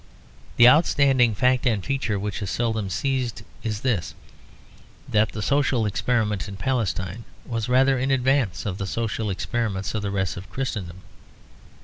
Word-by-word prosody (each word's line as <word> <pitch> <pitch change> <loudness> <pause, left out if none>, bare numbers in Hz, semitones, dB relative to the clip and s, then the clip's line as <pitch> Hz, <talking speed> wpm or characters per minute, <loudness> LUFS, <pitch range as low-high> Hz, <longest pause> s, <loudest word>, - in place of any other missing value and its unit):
The 120 - +8
outstanding 135 -5 +4
fact 125 +2 +2
and 105 -6 0
feature 135 -6 -1
which 105 +1 -4
is 100 - -3
seldom 110 0 -1
seized 125 +1 -2 0.2
is 110 -2 -3
this: 110 -11 -1 0.9
that 105 0 +2
the 105 - -4
social 140 -2 +2
experiment 105 -1 0
in 100 -1 -7
Palestine 95 -3 -2 0.2
was 115 -1 -3
rather 130 +1 +4
in 130 +2 0
advance 135 -5 +1
of 100 -2 -3
the 95 - -3
social 110 0 -2
experiments 100 0 -2
in 110 - -2
the 100 - -2
rest 95 -3 -2
of 90 0 -9
Christendom. 95 -5 -4
110 Hz, 150 wpm, -24 LUFS, 100-125 Hz, 0.9 s, The